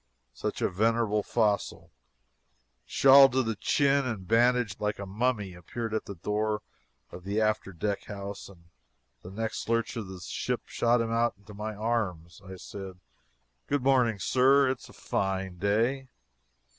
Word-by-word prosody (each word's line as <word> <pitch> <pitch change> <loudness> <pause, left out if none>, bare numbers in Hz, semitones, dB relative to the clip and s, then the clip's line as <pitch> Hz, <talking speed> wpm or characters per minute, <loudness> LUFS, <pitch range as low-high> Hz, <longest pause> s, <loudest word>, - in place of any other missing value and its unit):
Soon - - -3
a - - +3
venerable 110 +2 +1
fossil, 105 -2 -1 1.0
shawled 135 -1 +7
to 130 0 +2
the 115 -1 -1
chin 140 +6 +2
and 110 -8 -4
bandaged 120 -1 +2
like 105 0 -1
a 100 - -6
mummy, 105 -1 -1
appeared 110 +6 -6
at 110 - -1
the 100 - -7
door 105 +4 -1 0.5
of 90 - -10
the 100 +3 -1
after 110 -2 0
deck 100 +3 -3
house, 100 -1 -7
and 90 -4 -17 0.6
the 90 - -10
next 110 +3 -4
lurch 115 0 0
of 110 -4 -4
the 95 -1 -9
ship - - -3
shot 120 0 +1
him 115 0 -2
into 115 -3 -1
my 105 +1 -5
arms. 95 -8 -2
I 95 0 -9
said: 95 0 -9 0.7
"Good 145 -2 0
morning, 125 -5 +3
Sir. 130 +5 +4
It 130 - -4
is - - -14
a - - -14
fine 95 -2 -2
day." 115 +7 0
110 Hz, 155 wpm, -28 LUFS, 100-120 Hz, 1.0 s, shawled